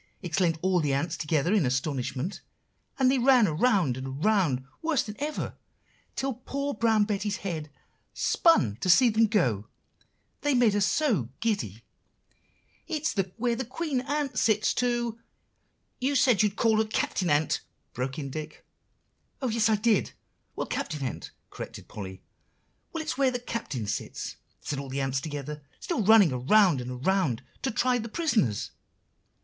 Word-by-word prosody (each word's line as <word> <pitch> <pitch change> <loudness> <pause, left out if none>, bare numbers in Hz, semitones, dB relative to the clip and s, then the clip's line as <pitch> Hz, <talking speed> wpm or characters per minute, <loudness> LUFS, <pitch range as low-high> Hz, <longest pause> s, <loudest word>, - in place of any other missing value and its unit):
exclaimed 175 -2 +1
all 185 -1 +3
the 145 -4 +1
ants 160 +4 -1
together 155 +4 0
in 205 -6 +4
astonishment; 135 +5 -2 0.6
and 260 -1 +4
they 265 - +2
ran 250 -2 +6
around 170 - +2
and 130 +1 -5 0.2
around 175 -12 +2 0.2
worse 320 -4 +1
than 210 - -7
ever, 295 +2 -3 0.6
till 270 0 -1
poor 280 +4 -4
Brown 225 -4 +3
Betty's 205 -1 -1
head 160 -5 -3 0.4
spun 120 - +3
to 185 - -2
see 245 +7 +7
them 225 0 +3
go, 120 - +1 0.7
they 290 -2 +2
made 240 -4 +4
her 205 - +1
so 205 - +1
giddy. 160 - -2 1.0
"'It's 315 -1 -1 0.2
where 240 0 +1
the 260 - -2
Queen 265 +2 -2
Ant 290 -1 -1
sits 215 -1 +2
to'" 240 -2 -1 0.8
"You 275 +3 0
said 250 -6 +4
you'd 210 -2 +1
call 225 -1 +3
her 220 - +3
Captain 195 -4 -1
Ant," 145 0 +2 0.3
broke 130 +3 -3
in 140 -3 -5
Dick. 155 +1 -7 0.7
"Oh, 260 - -1
yes, 225 -1 +1
so 220 - +4
I - - +5
did! 210 -1 +1 0.4
well, - - -2
Captain 150 -3 -3
Ant," 125 - -5 0.2
corrected - - -8
Polly. 95 -2 -8 0.7
"'Well, 325 -1 -3
it's 290 - -4
where 270 -1 +4
the 250 - -2
Captain 230 - -4
sits,' 100 - -4 0.2
said 145 - -3
the 135 0 -4
ants 135 -1 0
all - - -11
together, 150 0 -5 0.2
still 335 -10 -2
running 205 -5 +7
around 150 +4 +4
and 125 +1 -6
around, 185 -12 +1 0.2
'to 265 - 0
try 250 +2 +1
the 230 0 -5
prisoners. 215 - 0
205 Hz, 160 wpm, -28 LUFS, -, 1.0 s, see